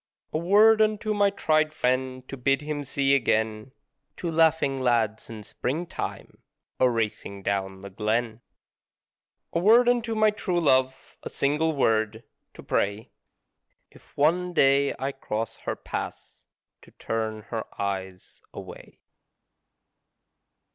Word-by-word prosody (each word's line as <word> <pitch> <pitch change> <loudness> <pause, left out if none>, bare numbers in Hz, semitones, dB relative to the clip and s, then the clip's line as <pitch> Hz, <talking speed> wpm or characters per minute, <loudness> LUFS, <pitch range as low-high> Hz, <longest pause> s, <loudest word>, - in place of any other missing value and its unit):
A - - +1
word 210 +5 +5
unto 215 0 +1
my 205 -1 +3
tried 155 -5 +1
friend 130 0 -1
to - - -6
bid 135 +2 +1
him 150 -1 -3
see 135 0 +1
again 110 -3 0 0.5
Two 170 - -3
laughing 160 -4 +2
lads 115 -4 0
in 110 -2 -8
Springtime 160 +11 -5 0.4
a 130 - +5
racing 105 -4 -3
down 95 -1 -2
the 100 0 -9
glen. 110 +3 -1 1.1
A 170 - +1
word 230 +7 +5
unto 240 -2 +1
my 215 0 +4
true 190 -4 -1
love 130 -4 +1
a - - -6
single 150 +3 0
word 110 -3 +1 0.3
to - - -11
pray 100 +2 -1 0.8
If - - -21
one 175 +5 +2
day 140 -2 +3
I 135 +2 -2
cross 115 -4 -4
her - - -1
path - - -7 0.4
to - - -17
turn 110 -1 -4
her 115 -2 -2 0.2
eyes 95 -2 -5
away. - - -11
135 Hz, 125 wpm, -26 LUFS, 110-165 Hz, 1.1 s, word